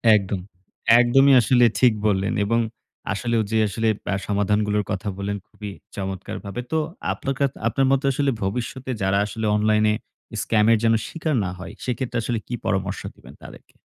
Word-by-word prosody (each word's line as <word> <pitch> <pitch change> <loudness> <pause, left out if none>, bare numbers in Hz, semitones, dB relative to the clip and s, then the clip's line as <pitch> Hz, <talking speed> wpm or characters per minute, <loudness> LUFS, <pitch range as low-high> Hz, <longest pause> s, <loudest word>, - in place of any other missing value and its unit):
একদম, 100 -1 -1 0.6
একদমই 135 +3 +5
আসলে 120 +2 +4
ঠিক 125 -3 +5
বললেন। 100 0 +1
এবং 115 +2 +2 0.5
আসলেও 115 +3 0
যে 110 - +2
আসলে 110 +3 -1 0.2
বা - - -1
সমাধানগুলোর 105 +1 +1
কথা 105 0 -3
বললেন 100 +1 -2
খুবই 105 -2 -8 0.2
চমৎকারভাবে। 95 +3 -5
তো 160 - +2 0.4
আপনার 135 - -3
কা 140 - +4 0.2
আপনার 135 - +2
মতো 135 +1 +2
আসলে 140 +1 +1
ভবিষ্যতে 125 +6 -3
যারা 95 +1 +2
আসলে 110 +1 -4
অনলাইনে 105 0 +3 0.5
স্ক্যামের 110 +1 +3
যেন 115 0 +4
শিকার 160 -3 -2
না - - -2
হয়, 95 - -8
সেক্ষেত্রে 125 -1 -2
আসলে 115 0 -1
কি - - -6
পরামর্শ 100 -2 -1
দিবেন - - -15
তাদেরকে? - - -13
110 Hz, 155 wpm, -23 LUFS, 100-125 Hz, 0.6 s, একদমই